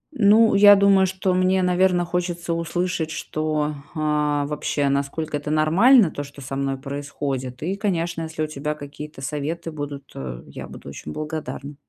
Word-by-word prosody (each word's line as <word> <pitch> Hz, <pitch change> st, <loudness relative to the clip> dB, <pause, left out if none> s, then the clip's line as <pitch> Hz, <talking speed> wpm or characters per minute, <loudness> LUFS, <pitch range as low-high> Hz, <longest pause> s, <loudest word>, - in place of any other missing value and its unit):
Ну, 220 Hz, 0 st, +5 dB
я 205 Hz, 0 st, +8 dB
думаю, 195 Hz, -1 st, +5 dB
что 185 Hz, 0 st, -1 dB
мне, 185 Hz, +1 st, +2 dB
наверное, 180 Hz, 0 st, +3 dB
хочется 175 Hz, -1 st, -2 dB
услышать, 170 Hz, 0 st, -2 dB
что, 155 Hz, -1 st, -2 dB, 0.2 s
а, 150 Hz, -1 st, +1 dB
вообще, 145 Hz, -1 st, -1 dB
насколько 140 Hz, +3 st, -2 dB
это 145 Hz, +1 st, -6 dB
нормально, 170 Hz, -, +5 dB
то, 145 Hz, -, -5 dB
что 140 Hz, 0 st, -12 dB
со 135 Hz, +1 st, -5 dB
мной 135 Hz, 0 st, -1 dB
происходит, 140 Hz, -2 st, -5 dB
и, 185 Hz, +4 st, -1 dB
конечно, 175 Hz, -5 st, -1 dB
если 160 Hz, -1 st, -3 dB
у -, -, -1 dB
тебя 150 Hz, 0 st, -3 dB
какие-то 150 Hz, 0 st, -9 dB
советы 150 Hz, +4 st, -3 dB
будут, 145 Hz, -3 st, -7 dB
э, 65 Hz, -2 st, -6 dB
я -, -, -8 dB
буду -, -, -10 dB
очень 75 Hz, -, -8 dB
благодарна. 150 Hz, -2 st, -5 dB
155 Hz, 160 wpm, -23 LUFS, 145-180 Hz, 0.2 s, я